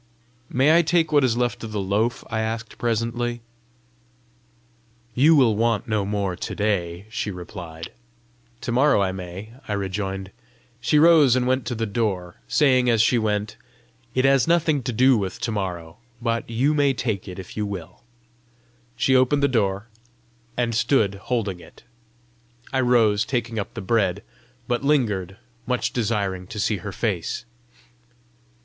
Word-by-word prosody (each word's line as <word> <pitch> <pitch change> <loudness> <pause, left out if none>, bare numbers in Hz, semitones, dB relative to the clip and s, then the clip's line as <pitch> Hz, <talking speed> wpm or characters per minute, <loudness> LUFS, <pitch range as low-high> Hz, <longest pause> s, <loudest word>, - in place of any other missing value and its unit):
"May 140 +5 +4
I 170 - +6
take 165 -1 +1
what 145 -2 +4
is 120 -3 +2
left 120 -1 -1
of 110 - -6
the 105 - -2
loaf?" 105 +5 0
I 110 - -1
asked 115 0 -4
presently. 120 +1 -1 1.7
"You 150 +7 +5
will 125 -7 +4
want 115 -1 0
no 110 -3 0
more 100 -2 -1
to - - -5
day," 95 -3 -1
she 110 - -3
replied. 85 -3 -8 0.7
"To - - -3
morrow 135 +1 +4
I 95 - 0
may!" 95 +4 -8
I 105 - -2
rejoined. 95 -1 -3 0.5
She 120 +6 +2
rose 155 -5 +6
and 125 -1 +1
went 130 0 0
to 120 - -2
the 115 0 -1
door, 100 -5 -2
saying 130 -4 +3
as 115 -2 +3
she 120 +1 +3
went, 105 0 -1 0.6
"It 130 +1 +2
has 135 -1 +4
nothing 165 -4 +2
to 125 0 -3
do 130 +1 +4
with 95 -2 -4
to 115 - -1
morrow 90 -5 -4 0.2
but 115 -1 -2
you 130 +6 +1
may 140 -2 +2
take 110 -7 -2
it 90 - -7
if 95 -2 -9
you 105 -1 -2
will." 95 -5 -7 0.9
She 130 +2 +2
opened 130 +3 +3
the - - +5
door, 100 -5 0 0.7
and 120 -1 0
stood 110 -2 +2 0.2
holding 105 -7 -1
it. - - -16 0.9
I 130 - +2
rose, 115 -4 +3
taking 120 -3 -2
up 100 - -6
the - - -4
bread 95 -2 0 0.4
but 120 +2 -1
lingered, 105 - 0 0.3
much 125 -1 -1
desiring 100 -6 -1
to 105 - -8
see 105 +1 +1
her 105 +1 -6
face. 100 0 -2
115 Hz, 160 wpm, -23 LUFS, 100-125 Hz, 1.7 s, I